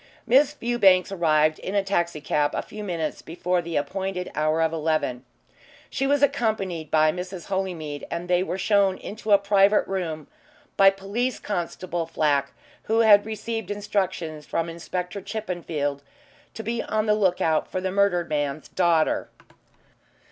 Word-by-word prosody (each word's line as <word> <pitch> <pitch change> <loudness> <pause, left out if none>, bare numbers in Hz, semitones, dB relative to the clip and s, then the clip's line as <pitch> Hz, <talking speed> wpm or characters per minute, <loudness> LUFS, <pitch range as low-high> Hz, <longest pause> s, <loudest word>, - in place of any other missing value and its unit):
Miss 275 +4 +4
Fewbanks 210 -9 +3
arrived 155 -4 +2
in 195 - -5
a 200 - +3
taxi 170 -5 -1
cab 145 0 0
a - - -2
few 210 0 -8
minutes 170 -5 -3
before 180 +2 -1
the 170 -1 -6
appointed 190 +4 -2
hour 155 +1 +1
of 160 0 0
eleven. 155 -6 -1 0.7
She 270 -1 0
was 285 0 +2
accompanied 220 - 0
by 155 0 +4
Mrs. 180 +1 -7
Holymead, 170 -7 -3
and 170 +1 -4
they 180 0 +3
were 185 0 -2
shown 195 -1 +2
into 215 +1 -8
a 200 - +9
private 200 +1 +3
room 165 -6 -3 0.5
by 195 0 +7
Police 200 +6 -2
Constable 175 -3 -3
Flack, 145 -4 +1 0.3
who 225 +1 +2
had 210 -2 +6
received 220 +1 -4
instructions 185 -7 -2
from 165 0 -1
Inspector 180 +3 -5
Chippenfield 170 -9 -3 0.5
to 225 - -6
be 230 +2 -2
on 215 0 -1
the 210 - +3
lookout 180 -6 +1
for - - -1
the 185 0 -2
murdered 190 -3 +2
man's 145 0 -2
daughter. 170 -3 +1
185 Hz, 150 wpm, -25 LUFS, 160-205 Hz, 0.7 s, a